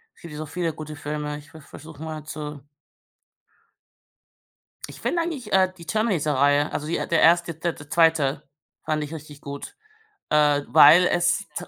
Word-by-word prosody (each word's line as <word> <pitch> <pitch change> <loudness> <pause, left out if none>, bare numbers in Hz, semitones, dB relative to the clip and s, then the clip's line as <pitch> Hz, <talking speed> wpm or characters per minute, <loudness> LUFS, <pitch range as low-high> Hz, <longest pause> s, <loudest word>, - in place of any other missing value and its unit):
Es - - -23
gibt 170 -3 -9
so 155 +1 -5
viele 165 +1 -3
gute 155 0 -8
Filme. 150 0 -4
Ich 145 0 -15
ve 160 - -12
versuche 155 +2 -12
mal 155 -2 -6
zu 150 -1 -7 2.3
Ich - - -12
finde 340 - 0
eigentlich, 285 -10 -5
äh, 185 -1 +3
die 170 - -12
„Terminator“-Reihe, 150 - +1
also 150 - -4
die 170 - -1
der 170 - 0
1. 170 0 +4
der 165 +2 -2
der 145 0 -14
2. 155 -4 +2 0.4
fand 155 -1 -1
ich 150 +2 -7
richtig 150 -2 -10
gut, 140 0 -8 0.5
äh, 150 -1 +3
weil 165 +5 +7
es 175 +2 +2 0.2
ze - - -5
155 Hz, 165 wpm, -24 LUFS, 150-170 Hz, 2.3 s, weil